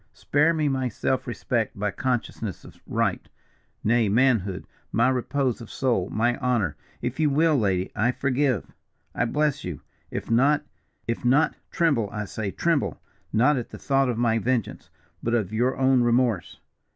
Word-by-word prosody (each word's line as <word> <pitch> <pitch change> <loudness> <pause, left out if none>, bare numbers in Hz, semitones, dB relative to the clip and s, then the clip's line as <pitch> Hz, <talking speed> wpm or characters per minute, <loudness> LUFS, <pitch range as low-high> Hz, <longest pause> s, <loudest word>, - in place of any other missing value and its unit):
Spare 150 +3 +2
me 155 -2 0
my 130 -2 0
self 130 +4 -1
respect, 120 -2 -1
my 105 +1 -1
consciousness 115 -2 -3
of - - -14
right, - - -1 0.5
nay 115 -1 +3
manhood, 110 -5 +2 0.3
my 120 +2 +3
repose 130 0 0
of 115 - -9
soul, 115 -8 0
my 120 +3 +1
honour. 120 -10 0 0.3
If 125 +5 -3
you 155 -2 +3
will, 155 +2 +3
lady, 95 -7 0
I 110 +4 +2
forgive, 130 - 0 0.5
I - - 0
bless 145 +3 0
you. 90 -5 -5 0.3
If - - -5
not 140 +6 +4 0.4
if 115 0 -2
not, 135 +6 +3 0.2
tremble, 140 -11 +1
I 105 0 -3
say, 105 +1 -4
tremble, 165 - 0 0.3
not 130 +6 +3
at 120 - -4
the - - -9
thought 135 -1 +1
of 120 - -1
my 115 -1 +2
vengeance, 120 0 -2 0.3
but 120 +1 0
of 105 -3 -1
your 125 +4 +1
own 130 -1 +4
remorse. 120 -5 +1
120 Hz, 165 wpm, -25 LUFS, 110-135 Hz, 0.5 s, not